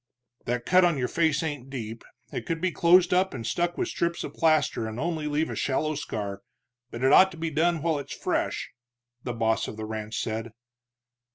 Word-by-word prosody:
"That 120 0 -2
cut 185 0 +5
on 170 -4 +3
your 125 -2 0
face 160 -1 +1
ain't 145 -5 -4
deep, 115 -4 -6 0.3
it - - -4
could 165 -1 -1
be 185 +1 0
closed 175 +2 +5
up 185 -3 +2
and 115 -3 -5
stuck 175 +9 -1
with - - 0
strips 170 0 -1
of - - -6
plaster 155 -8 +2
and 110 +2 -6
only 160 -1 -2
leave 150 +2 0
a - - -4
shallow 155 +3 0
scar, 100 -8 -4 0.5
but 120 +1 -6
it 135 +2 +5
ought 190 - +8
to - - -11
be 160 0 -3
done 160 +1 +1
while 160 -3 +1
it's 140 - -7
fresh," - - -2 0.5
the 125 - -4
boss 110 -1 +1
of 110 - -7
the 110 - -4
ranch 110 0 -4
said. 110 +1 -3
145 Hz, 205 wpm, -27 LUFS, 115-170 Hz, 0.5 s, ought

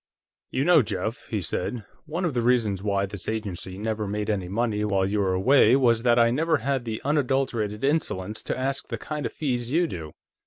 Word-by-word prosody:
"You 130 - 0
know, 175 -3 +6
Jeff," 110 0 -4
he 105 -4 -2
said, 100 +7 -3 0.2
"one 170 +4 -2
of 165 - -1
the 120 - 0
reasons 115 -5 +2
why 100 -1 0
this 100 -1 -6
agency 100 -4 -4
never 110 0 -2
made 105 +1 -1
any 95 -4 -2
money 105 +1 -1
while 100 -2 +1
you 105 +2 0
were 95 -2 +1
away 120 +4 +5
was 120 -4 +3
that 120 0 +3
I 115 -1 +5
never 160 +5 +2
had 135 -3 -1
the 110 -1 -3
unadulterated 130 -7 0
insolence 110 - -1
to - - -2
ask 135 +1 -2
the - - -4
kind 150 -1 -4
of - - -9
fees 125 -5 -2
you 170 +4 +3
do. 80 - -6
115 Hz, 205 wpm, -25 LUFS, 100-135 Hz, 0.2 s, know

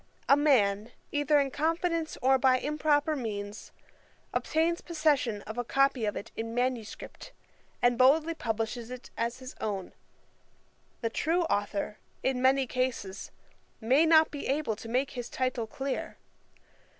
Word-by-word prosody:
A 275 - +7
man, 230 -7 +2 0.2
either 290 0 +3
in 275 -1 0
confidence 330 +2 -1
or 265 +1 +5
by 255 0 +4
improper 300 +2 +1
means, 210 -5 -5 0.6
obtains 330 +2 +1
possession 290 -10 +1
of 220 +3 -6
a - - 0
copy 275 -1 +2
of 210 - -1
it - - -6
in 225 +1 -4
manuscript, 245 -3 -3 0.5
and 245 -1 +3
boldly 305 +6 +5
publishes 230 -3 -3
it 255 0 -9
as 235 +1 -2
his 260 0 -9
own. 200 -4 -3 1.1
The 230 -1 -1
true 335 +8 +1
authour, 205 -6 -2 0.2
in 260 -1 0
many 265 +1 +4
cases, 255 -6 -3 0.5
may 265 +8 +4
not 315 -1 +6
be 290 -1 -5
able 275 -5 0
to 225 - -9
make 255 +4 0
his 245 -2 -6
title 255 -3 -1
clear. 270 +4 -4
255 Hz, 140 wpm, -29 LUFS, 230-295 Hz, 1.1 s, A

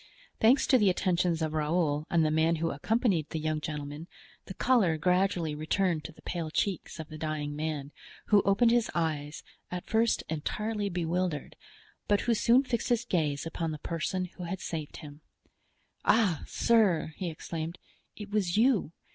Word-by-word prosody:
Thanks 245 +5 +5
to 260 - +4
the 205 -3 +4
attentions 175 -2 +1
of 155 -1 -2
Raoul 155 -1 0
and 165 -2 +3
the 155 - +1
man 160 +2 +3
who 165 +1 -1
accompanied 190 - 0
the - - -3
young 155 0 -1
gentleman, 150 +1 -5 0.4
the 190 - -8
color 215 -11 +3
gradually 180 -1 +1
returned 155 +2 0
to - - -6
the - - -19
pale 170 -3 -3
cheeks 185 +2 -2
of 155 - -7
the 155 -1 -9
dying 150 -2 -3
man, 150 -2 -3 0.4
who 210 -2 +6
opened 215 +5 +3
his 240 -1 +2
eyes, 155 -3 -2 0.3
at 180 -1 -5
first 225 +1 +2
entirely 205 +7 -2
bewildered, 175 -3 -2 0.5
but 205 -1 +3
who 235 - +1
soon 235 +4 +4
fixed 245 -3 -2
his 235 -1 +1
gaze 150 - 0
upon 165 0 -3
the 155 - -4
person 170 +4 -2
who 180 0 -9
had 185 +2 -4
saved 155 -5 -5
him. 150 -1 -11 0.8
"Ah, 200 -9 +3
sir," 195 -9 +2
he 180 -3 -3
exclaimed, 165 +1 -5 0.4
"it 210 -1 -9
was 200 -3 0
you! 225 - +3
170 Hz, 170 wpm, -29 LUFS, 155-200 Hz, 0.8 s, who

